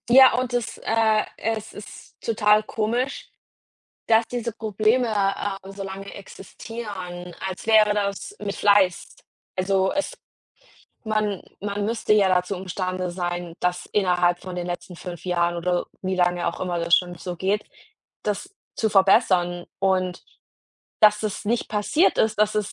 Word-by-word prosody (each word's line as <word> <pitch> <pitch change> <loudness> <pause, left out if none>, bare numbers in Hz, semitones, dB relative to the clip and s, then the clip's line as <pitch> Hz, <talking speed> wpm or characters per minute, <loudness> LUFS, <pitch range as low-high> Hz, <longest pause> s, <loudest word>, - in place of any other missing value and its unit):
Ja 260 +1 +8
und 255 -1 -3
es 245 -2 -2
äh, 220 -1 +2
es 220 -1 -3
ist 210 - -12
total 210 -1 +3
komisch, 235 +5 -2 0.8
dass 225 0 +4
diese 240 -1 -3
Probleme, 220 +3 +1
äh, 195 -1 -1
so 195 0 -7
lange 195 0 -7
existieren, 195 -3 -8
als 190 +1 -6
wäre 215 -2 +6
das 205 - -3
mit 200 0 -4
Fleiß. 200 -3 +3 0.4
Also 190 0 +1
es 295 +12 -2 0.9
man 215 -3 -1 0.2
man 205 +1 -2
müsste 225 0 0
ja 205 -2 +5
dazu 180 +1 +1
imstande 185 -1 -3
sein, 175 -1 -4
dass 180 0 -1
innerhalb 180 -3 +2
von 185 -1 -7
den 175 -1 -3
letzten 180 +1 -5
5 175 -1 -8
Jahren 175 -1 +1
oder 175 +1 -1 0.2
wie 185 0 -1
lange 175 -1 +1
auch 170 - -2
immer 180 -2 -1
das 170 0 +3
schon 175 -1 -1
so 180 +1 -5
geht, 195 +4 0 0.6
das 210 - -3 0.2
zu 220 - +1
verbessern 185 -3 +3
und 185 -2 0 0.8
dass 210 0 +6
das 215 -1 -3
nicht 230 +3 0
passiert 220 - +2
ist, 220 -1 +2
dass 215 0 +3
es 210 -2 -1
195 Hz, 150 wpm, -24 LUFS, 180-215 Hz, 0.9 s, Ja